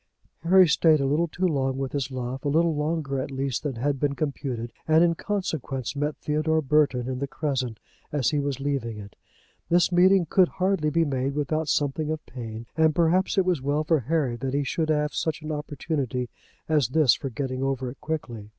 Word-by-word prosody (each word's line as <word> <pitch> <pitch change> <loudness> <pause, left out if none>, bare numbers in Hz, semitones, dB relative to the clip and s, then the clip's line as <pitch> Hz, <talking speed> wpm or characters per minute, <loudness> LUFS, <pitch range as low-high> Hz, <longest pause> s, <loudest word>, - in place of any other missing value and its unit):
Harry 185 +2 +6
stayed 155 0 +4
a 140 - 0
little 150 +5 +1
too 180 +4 -2
long 135 -4 0
with 135 -1 -3
his 140 -2 -2
love, 130 0 -5
a - - -1
little 165 +2 +2
longer 150 -2 -1
at 130 - -3
least 135 -2 -2
than 145 -4 -3
had 135 +3 -1
been 140 0 0
computed, 130 -6 -3
and 160 +1 +5
in 170 -1 +3
consequence 160 - -3
met 145 +1 -1
Theodore 155 +1 0
Burton 140 -4 +2
in 130 -1 -3
the 140 - -2
Crescent 130 -6 -2 0.3
as 145 -4 +1
he 150 - +1
was 140 -2 -2
leaving 135 -6 -2
it. 100 -1 -10 0.5
This 175 +1 +3
meeting 180 +1 +5
could 180 +3 +4
hardly 185 -5 0
be 165 +2 +2
made 135 -1 -1
without 150 +1 -1
something 145 +1 0
of 155 0 -3
pain, 115 -2 -7
and 160 -1 +3
perhaps 175 +4 +2
it 190 - +4
was 180 -6 +1
well 145 +3 0
for 155 0 +2
Harry 135 -1 0
that 135 +2 -3
he 145 - +1
should 155 +3 -1
have 150 -1 +1
such 160 -1 -2
an 155 - -4
opportunity 145 -4 -3 0.4
as 150 -6 +2
this 140 0 +4
for 135 - -4
getting 130 +1 -4
over 130 -2 -1
it 135 - -15
quickly. 130 -9 -5
145 Hz, 205 wpm, -25 LUFS, 130-160 Hz, 0.5 s, Harry